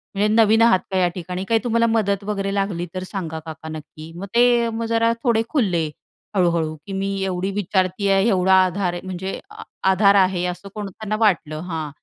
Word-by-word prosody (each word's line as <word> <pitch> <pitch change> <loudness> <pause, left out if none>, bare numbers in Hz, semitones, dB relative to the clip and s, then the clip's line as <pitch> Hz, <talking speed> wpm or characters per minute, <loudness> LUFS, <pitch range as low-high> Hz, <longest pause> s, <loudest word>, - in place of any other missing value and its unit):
म्हणजे 205 +2 +2
नवीन 225 0 +5
आहात 230 -5 +5
का 190 - 0
या 180 -1 +3
ठिकाणी? 180 +1 -5
काय 225 - +4
तुम्हाला 230 -1 +2
मदत 205 -3 +1
वगैरे 195 -1 -2
लागली 195 -3 -1
तर 185 0 -4
सांगा 165 -5 -4
काका 160 0 -8
नक्की. 155 +1 -9
मग 185 +3 -6
ते 240 -1 +4
मग 230 0 -3
जरा 230 0 +2
थोडे 235 -3 +3
खुलले 180 - +1 0.5
हळूहळू. 170 -4 +1
की 195 - -5
मी 195 +1 -2
एवढी 190 0 -2
विचारती 195 0 0
आहे, 195 +3 +3
एवढा 190 -2 +3
आधार 185 -1 -1
आहे 175 - -5
म्हणजे 190 +1 -5
आ - - -11 0.3
आधार 200 +1 +4
आहे, 185 -2 +3
असं 180 +3 -5
कोण 210 -2 -4
त्यांना 215 +2 -4
वाटलं 165 -8 +1
हां. 160 -3 -3
195 Hz, 195 wpm, -21 LUFS, 180-210 Hz, 0.5 s, नवीन